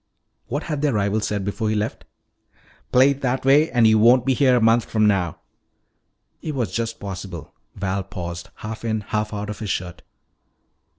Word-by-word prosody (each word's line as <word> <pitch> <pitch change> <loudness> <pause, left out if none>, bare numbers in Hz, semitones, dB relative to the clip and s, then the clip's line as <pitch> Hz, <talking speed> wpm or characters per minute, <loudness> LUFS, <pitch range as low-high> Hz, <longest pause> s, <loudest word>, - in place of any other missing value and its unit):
What 145 +5 -3
had 150 -3 -3
their 145 -3 +1
rival 105 0 +1
said 105 -2 -2
before 105 +2 -2
he 110 - 0
left? 105 +1 -3 0.9
"Play 130 +2 +6
it 140 0 -5
that 130 0 -1
way 145 +4 +5
and 120 -3 +3
you 110 0 +5
won't 120 +3 +5
be 135 - +3
here 130 0 +4
a - - +4
month 115 +1 +3
from 110 -1 +1
now." 90 -6 +1 1.0
It 155 -2 -4
was 120 -8 -1
just 115 +1 -3
possible 95 -4 -7 0.2
Val 95 0 -2
paused, 85 -3 -7 0.2
half 110 +1 -6
in, 110 -2 -1
half 105 +1 -2
out 105 0 -4
of, 105 - -8
his 110 -3 -5
shirt. 90 -2 -3
110 Hz, 185 wpm, -22 LUFS, 100-125 Hz, 1.0 s, Play